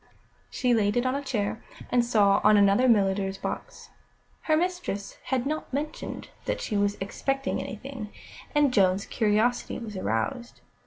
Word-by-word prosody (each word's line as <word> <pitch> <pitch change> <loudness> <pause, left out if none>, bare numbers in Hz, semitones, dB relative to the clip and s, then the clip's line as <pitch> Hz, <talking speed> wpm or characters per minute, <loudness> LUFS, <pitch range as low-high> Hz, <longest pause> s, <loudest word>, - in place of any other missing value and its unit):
She 250 -1 +1
laid 210 -1 +2
it 245 - +1
on 255 - +1
a 280 - -1
chair, 220 -5 -2 0.3
and 245 -1 +4
saw 205 -4 +3
on 210 0 +6
another 200 +5 +5
a - - +4
milliner's 195 -3 +2
box. - - -6 0.5
Her 310 -1 +2
mistress 350 - -3
had 260 -1 0
not 310 +2 -3
mentioned 300 +4 -4 0.2
that - - -1
she 210 - -3
was 205 0 +1
expecting 270 +7 -2
anything, 225 -1 -7 0.4
and 290 -3 +4
Joan's 195 -1 +3
curiosity 220 +2 +1
was 225 -4 -7
aroused. 185 - -2
225 Hz, 155 wpm, -27 LUFS, 200-260 Hz, 0.5 s, on